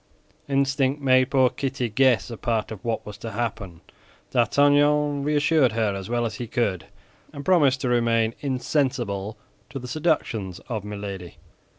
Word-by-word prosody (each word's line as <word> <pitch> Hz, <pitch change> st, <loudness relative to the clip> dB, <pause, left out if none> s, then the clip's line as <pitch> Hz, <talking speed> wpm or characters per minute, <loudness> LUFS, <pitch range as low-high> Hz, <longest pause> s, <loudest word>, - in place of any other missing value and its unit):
Instinct 135 Hz, 0 st, +1 dB
made 130 Hz, -2 st, +3 dB
poor 130 Hz, -2 st, +3 dB
Kitty 135 Hz, -2 st, -2 dB
guess 120 Hz, -2 st, +2 dB
a -, -, -5 dB
part 115 Hz, -1 st, -1 dB
of 110 Hz, -1 st, -8 dB
what 115 Hz, -2 st, -2 dB
was 105 Hz, -, -9 dB
to 115 Hz, -, -6 dB
happen. 100 Hz, -6 st, -4 dB, 0.5 s
D'Artagnan 145 Hz, +3 st, +3 dB
reassured 150 Hz, -3 st, +2 dB
her 110 Hz, -3 st, 0 dB
as 95 Hz, 0 st, -6 dB
well 120 Hz, 0 st, 0 dB
as 110 Hz, -2 st, -4 dB
he 120 Hz, -, -5 dB
could, 105 Hz, -7 st, -1 dB, 0.4 s
and 140 Hz, -2 st, -8 dB
promised 145 Hz, -8 st, +3 dB
to 125 Hz, -, -1 dB
remain 115 Hz, -2 st, +2 dB
insensible 125 Hz, -7 st, -1 dB, 0.3 s
to -, -, -6 dB
the 125 Hz, -1 st, -7 dB
seductions 120 Hz, -, -1 dB
of 110 Hz, -6 st, -3 dB
Milady. 100 Hz, -4 st, -7 dB
120 Hz, 155 wpm, -24 LUFS, 110-140 Hz, 0.5 s, made